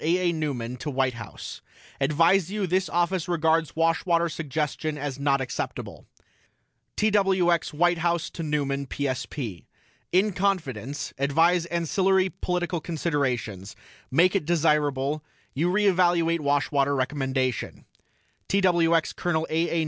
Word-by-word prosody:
A. 175 +3 +2
A. - - -3
NEUMAN 130 -6 -3
TO 150 - -5
WHITE 130 -2 0
HOUSE: 115 -3 -8 0.4
ADVISE 165 +6 +3
YOU 205 0 -1
THIS 185 +1 0
OFFICE 175 +1 0
REGARDS 160 -2 +1
WASHWATER 165 +1 +2
SUGGESTION 155 0 -3
AS 140 -2 -4
NOT 140 -1 +2
ACCEPTABLE 130 - -5 0.9
TWX 190 -5 +2
WHITE 175 +3 +2
HOUSE 170 0 0
TO - - -7
NEUMAN 140 -3 -1
PSP: 130 - -4 0.5
IN 195 +4 +3
CONFIDENCE 150 - -2
ADVISE 165 +5 +3
ANCILLARY 190 +3 +1
POLITICAL 180 -2 -2
CONSIDERATIONS 125 - -2 0.3
MAKE 175 +8 +3
IT 180 - -4
DESIRABLE 150 -3 +1 0.3
YOU 165 +6 +1
RE 205 +3 +2
EVALUATE 175 -3 +3
WASHWATER 140 -1 +1
RECOMMENDATION 130 -2 -2 0.6
TWX 170 -4 +2
COL. 160 -2 0
A. 165 +2 +1
A. 170 - 0
160 Hz, 120 wpm, -26 LUFS, 140-175 Hz, 0.9 s, ADVISE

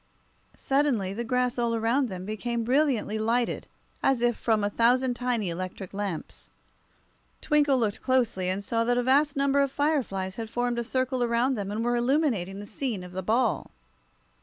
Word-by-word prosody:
Suddenly 270 -9 0
the 235 +4 -3
grass 250 +1 0
all 235 -1 +1
around 235 +4 +1
them 185 -1 -6
became 230 +3 -2
brilliantly 250 -4 +1
lighted, 230 +2 0 0.3
as 260 -3 +2
if 240 -1 +3
from 220 -3 +1
a 205 - +1
thousand 245 +3 +3
tiny 240 -4 -1
electric 185 +2 -6
lamps. 165 - -5 0.9
Twinkle 290 -2 +3
looked 220 -4 -1
closely, 235 -8 +1
and 190 +2 -2
saw 230 +2 0
that 245 +1 +2
a 245 - +2
vast 280 +4 +3
number 280 0 +2
of 275 -1 +2
fireflies 255 -11 -1
had 225 -1 -5
formed 245 0 -1
a - - -1
circle 255 +1 -1
around 240 +3 +2
them, 200 -5 -3
and 220 +3 -2
were 240 0 +1
illuminating 240 - 0
the 205 - -7
scene 215 -3 -4
of 180 - -10
the 185 +1 -4
ball. 225 +5 +1
235 Hz, 175 wpm, -27 LUFS, 205-260 Hz, 0.9 s, if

